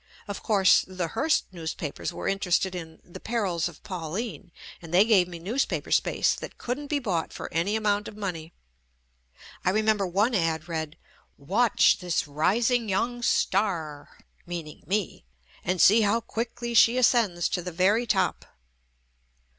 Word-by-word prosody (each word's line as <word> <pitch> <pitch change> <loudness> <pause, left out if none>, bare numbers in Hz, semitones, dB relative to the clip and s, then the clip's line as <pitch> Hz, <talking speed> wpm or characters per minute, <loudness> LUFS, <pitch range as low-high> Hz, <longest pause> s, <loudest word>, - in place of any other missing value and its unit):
Of 200 - -6
course, 195 -4 +4
the 185 -3 -4
Hearst 315 - +1
newspapers 160 -3 -5
were - - -5
interested 190 -1 +1
in"ThePer 180 +6 -5
ils 170 -3 -1
of - - -12
Pauline," 180 0 -5 0.3
and 165 -2 -11
they 185 +4 +5
gave 200 -6 +4
me 175 -1 -8
newspaper 220 +11 -2
space - - +2
that - - -8
couldn't 260 +4 -4
be 295 - 0
bought 190 - -2
for - - -8
any 175 +6 0
amount 210 -1 0
of 210 - -10
money. 175 -6 -5 1.1
I - - +2
remember 215 0 +1
one 205 +7 +1
ad 165 -4 0
read 160 -1 -4 0.3
" - - -41
WATCH 200 +13 +3
THIS 175 -4 -1
RISING 225 - +1
YOUNG 240 +5 -1
STAR 170 -10 -1 0.3
(meaning 170 -3 -7
me) 200 - -2 0.4
AND 180 +1 -1
SEE 215 +7 +6
HOW 215 +2 +2
QUICKLY 235 +1 -4
SHE 235 +2 +6
ASCENDS 225 -8 +3
TO 180 - -2
THE 180 +1 -6
VERY 200 +8 +2
TOP." 195 -3 0
190 Hz, 150 wpm, -26 LUFS, 170-225 Hz, 1.1 s, SEE